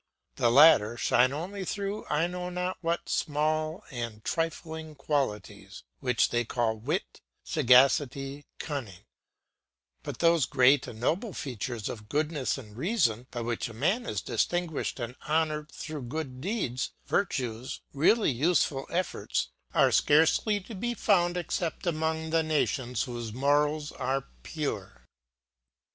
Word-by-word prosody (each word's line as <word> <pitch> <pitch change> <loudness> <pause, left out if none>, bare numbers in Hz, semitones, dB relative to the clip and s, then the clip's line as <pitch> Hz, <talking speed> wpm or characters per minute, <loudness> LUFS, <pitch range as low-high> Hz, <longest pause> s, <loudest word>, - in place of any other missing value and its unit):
The 120 - +3
latter 120 -4 +7
shine 125 +2 +3
only 185 +7 -4
through 200 +2 -3
I 150 +3 +2
know 180 0 -4
not 180 +1 -3
what 170 0 -1
small 155 +2 0
and 115 -4 -6
trifling 160 -1 -3
qualities, 140 -8 -3 0.2
which 125 -3 +2
they 120 0 +1
call 115 -1 0
wit, 105 - -3 0.2
sagacity, 135 +2 +3
cunning; 130 - -5 1.0
but - - -6
those 165 -4 +3
great 130 +2 +4
and 110 - -9
noble 185 - 0
features 120 -3 -4
of 105 -2 -7
goodness 150 -1 0
and 105 -6 -11
reason, 130 - +1
by 120 - -5
which 120 0 -2
a 115 - -10
man 195 - 0
is - - -2
distinguished 175 -5 -1
and 120 +1 -4
honoured 155 -1 0
through 155 -2 -6
good 130 0 -5
deeds, 170 - -2
virtues, 125 - -2
really 165 +8 +4
useful 140 0 +1
efforts, 180 +1 -1 0.2
are - - +4
scarcely 160 +8 +4
to 225 - -10
be 240 +5 -2
found 180 -5 +2
except 175 0 -2
among 160 -1 -1
the 165 0 +3
nations 140 -6 0
whose 120 -3 -5
morals 145 +3 +1
are 135 0 -2
pure. - - -5
145 Hz, 130 wpm, -29 LUFS, 125-165 Hz, 1.0 s, latter